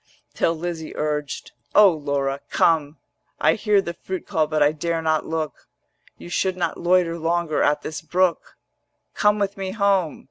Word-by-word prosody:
Till 165 - +1
Lizzie 165 -1 -5
urged, 150 -1 -3 0.2
'O 205 -2 +8
Laura, 140 -3 -2
come; 155 -2 +2 0.4
I - - +4
hear 205 -2 +2
the 170 - -4
fruit 185 +1 -6
call 160 -6 0
but 155 -1 +2
I 145 - +4
dare 165 +2 -2
not 160 -1 0
look: 155 -4 -4 0.5
You - - -11
should 185 +1 -1
not 170 -2 -2
loiter 175 -1 +2
longer 165 -1 0
at 145 +1 +2
this 155 - -5
brook: 180 +1 0 0.6
Come 210 0 +3
with 200 -1 -2
me 190 -1 -4
home. 195 -6 +1
165 Hz, 165 wpm, -23 LUFS, 155-185 Hz, 0.6 s, O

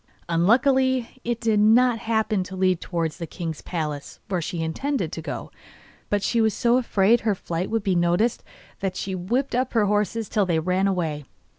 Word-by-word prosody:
Unluckily, 255 +8 +2
it 235 -1 -2
did 225 -3 +2
not 230 +3 +5
happen 220 -3 0
to 190 - -8
lead 185 -2 +1
towards 165 -3 -2
the 170 - -5
king's 165 -2 -5
palace, 150 -4 -5
where 185 -3 0
she 165 0 -3
intended 270 - -2
to - - -5
go, - - -6 0.6
but 205 -1 0
she 235 - +2
was 220 -1 +2
so 240 +1 +3
afraid 230 -2 +3
her 215 -2 0
flight 175 0 -3
would 225 -2 -1
be 195 -3 +1
noticed 175 +7 +1 0.4
that 190 -1 -2
she 190 - -4
whipped 235 +10 -1
up 250 +1 0
her 225 -3 +3
horses 210 +2 0
till 205 -3 +1
they 170 -2 +1
ran 185 +4 +1
away. 160 -6 -2
200 Hz, 185 wpm, -24 LUFS, 175-230 Hz, 0.6 s, not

